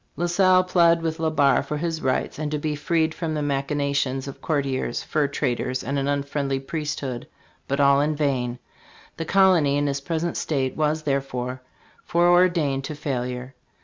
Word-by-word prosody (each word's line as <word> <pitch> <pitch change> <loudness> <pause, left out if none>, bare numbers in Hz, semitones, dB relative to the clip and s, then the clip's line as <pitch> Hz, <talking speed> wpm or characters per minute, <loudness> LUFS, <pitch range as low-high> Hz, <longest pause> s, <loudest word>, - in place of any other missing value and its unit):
La 175 - -1
Salle 185 +1 +4
plead 170 -2 +3
with 160 0 -2
Le 160 -1 +1
Barre 145 -3 +3
for 150 +2 -4
his 165 0 -2
rights 130 +2 -1
and 155 -1 -2
to 150 - -1
be 150 0 -2
freed 160 +1 0
from 160 -2 -3
the 150 - -1
machinations 140 -1 -1
of 140 - -9
courtiers, 135 -5 -1
fur 150 -2 0
traders 125 -2 -2
and 140 +2 -1
an 135 - -1
unfriendly 140 -1 -1
priesthood, 140 -3 -4 0.4
but 140 +1 -1
all 140 0 +5
in 150 +1 0
vain. 130 -5 -1 0.6
The 165 - -3
colony 175 -7 +4
in 145 0 +1
its 140 0 -2
present 165 +2 -2
state 135 -4 -1
was, 155 0 0
therefore, 130 -3 -2 0.4
foreordained 175 -5 +3
to 150 - -5
fail 135 -4 -2
ure. 125 +1 -6
145 Hz, 175 wpm, -24 LUFS, 135-160 Hz, 0.6 s, all